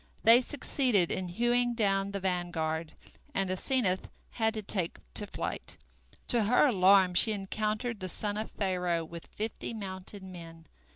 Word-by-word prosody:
They 230 +3 +8
succeeded 250 - +1
in 185 - -2
hewing 240 +5 +1
down 195 -3 +1
the 200 - -3
vanguard, 165 -4 -2 0.4
and 195 -1 0
Asenath 190 -1 0 0.2
had 220 -1 0
to 215 - -4
take 185 -4 -1 0.2
to 205 - -1
flight. - - -5 0.5
To 235 -4 +3
her 245 +7 +5
alarm 190 -3 +5
she 215 +5 +6
encountered 215 +3 -2
the 185 -1 -4
son 205 +3 -1
of 215 +1 -3
Pharaoh 180 -4 -1
with 170 +1 -10
fifty 220 +1 -4
mounted 190 -1 -7
men. 165 -3 -10
195 Hz, 150 wpm, -30 LUFS, 180-220 Hz, 0.5 s, They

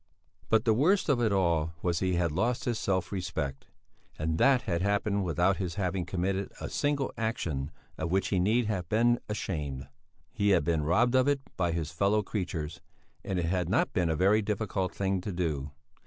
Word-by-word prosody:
But 110 - +3
the 110 - +4
worst 170 - +3
of 130 -4 +3
it 110 -3 +2
all 85 -4 +1
was 85 -2 +1
he 95 -1 0
had 85 -2 +1
lost 120 +10 0
his 120 -2 -1
self 95 -3 -1
respect. 80 -8 -4 0.5
And 80 +1 -1
that 135 -3 +4
had 85 -1 -1
happened 100 0 +1
without 90 +3 +2
his 90 -4 -3
having 95 -2 -1
committed 95 +2 -1
a - - -5
single 145 -2 0
action 80 -11 -2 0.3
of 80 - -2
which 95 +1 +1
he 95 - +1
need 110 +6 +2
have 95 -5 -2
been 120 +2 +3
ashamed. 75 -10 -3 0.4
He 100 0 +1
had - - 0
been 85 -2 +1
robbed 115 - +3
of 130 +1 +4
it 145 -1 +2
by 90 -2 0
his 80 -3 -3
fellow 100 +5 +2
creatures, 85 -7 -4 0.4
and 95 - -2
it 85 - 0
had 90 0 0
not - - +1
been 90 -2 +1
a 80 - +1
very 100 +6 +4
difficult 100 -2 -2
thing 95 -1 -1
to 100 - -4
do. 80 -6 -2
95 Hz, 195 wpm, -29 LUFS, 85-105 Hz, 0.5 s, the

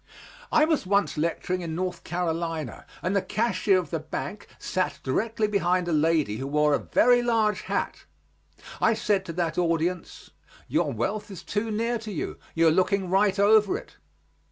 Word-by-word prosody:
I 310 - +5
was 315 - 0
once 200 +1 +2
lecturing 170 +3 -1
in 165 -2 -4
North 180 +1 -3
Carolina, 165 -5 -3 0.2
and 185 +3 0
the 200 - +3
cashier 210 0 +1
of 175 -5 -3
the 165 - -1
bank 175 +6 -6
sat 185 0 -2
directly 220 - 0
behind 185 -3 +1
a - - -1
lady 155 -8 +2
who 135 +3 -4
wore 150 +1 +2
a - - +2
very 245 0 +4
large 225 -3 +1
hat. - - -3 0.8
I 225 - +4
said 200 -3 0
to 165 - -6
that 170 -1 -1
audience, 170 +1 -1 0.4
"Your - - +1
wealth 205 - -2
is 195 - -9
too 215 +2 -2
near 230 +2 -1
to 220 -1 -7
you; 170 - -4 0.2
you 165 0 +4
are - - +6
looking 185 +2 +1
right 195 +1 +3
over 205 0 +4
it." - - -13
185 Hz, 175 wpm, -26 LUFS, 165-210 Hz, 0.8 s, are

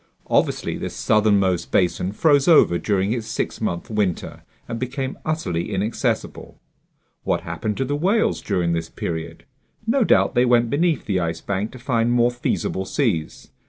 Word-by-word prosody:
Obviously - - +1
this - - -5
southernmost 100 -4 +2
basin 90 0 +1
froze 145 - +3
over 150 - +5
during 100 0 0
its 115 -3 -4
six - - -3
month 85 - -2
winter 105 -5 -2 0.3
and 115 -1 -4
became 130 +2 -3
utterly 100 - -2
inaccessible. 105 +3 -2 0.6
What - - 0
happened 105 -2 -4
to 135 - 0
the 145 +3 -1
whales 195 +9 +1
during 90 -4 0
this 80 -1 -3
period? 80 0 -5 0.4
No 240 +3 +2
doubt - - +3
they 120 -1 +3
went 120 -2 +3
beneath 160 +1 +1
the 95 -3 0
Ice 85 -1 -2
Bank 100 +2 -2
to - - -9
find 120 -2 0
more 120 0 +3
feasible 120 -5 -2
seas. 95 - -2
110 Hz, 160 wpm, -22 LUFS, 95-130 Hz, 0.6 s, over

